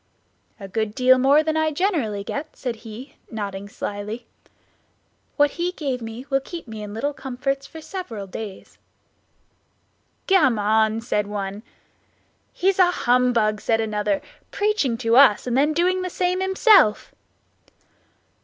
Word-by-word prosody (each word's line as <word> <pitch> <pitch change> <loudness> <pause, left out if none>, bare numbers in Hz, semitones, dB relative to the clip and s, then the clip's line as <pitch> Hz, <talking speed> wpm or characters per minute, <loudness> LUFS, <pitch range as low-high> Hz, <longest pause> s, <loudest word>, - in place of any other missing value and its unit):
"A 195 - -8
good 220 +1 -2
deal 255 0 +5
more 280 +4 +5
than 315 0 -1
I 315 0 +2
generally 290 - -1
get," 285 +9 -6
said 245 -3 -4
he, 230 +4 -11
nodding 200 -2 -5
slyly; 210 +4 -5 1.1
"what 290 -1 +4
he 355 +1 -2
gave 270 -7 -3
me 225 +3 -7
will 270 - +3
keep 330 +2 -9
me 220 -1 -7
in 210 0 -7
little 285 +6 -2
comforts 275 +1 -3
for 320 - -11
several 280 - -6
days." 195 +1 -9 1.5
"Gammon!" 220 - +3
said 210 -3 -1
one. 200 0 -4 0.9
"He's 385 +1 0
a 365 -1 +6
humbug," 240 -8 +2
said 225 -1 +1
another; 220 +7 -1 0.3
"preaching 405 - 0
to 230 0 +2
us 265 -7 +6
and 245 -1 -1
then 290 +3 +3
doing 360 +4 +1
the 365 - -3
same 360 +1 -1
himself." 380 - +4
250 Hz, 135 wpm, -23 LUFS, 215-315 Hz, 1.5 s, a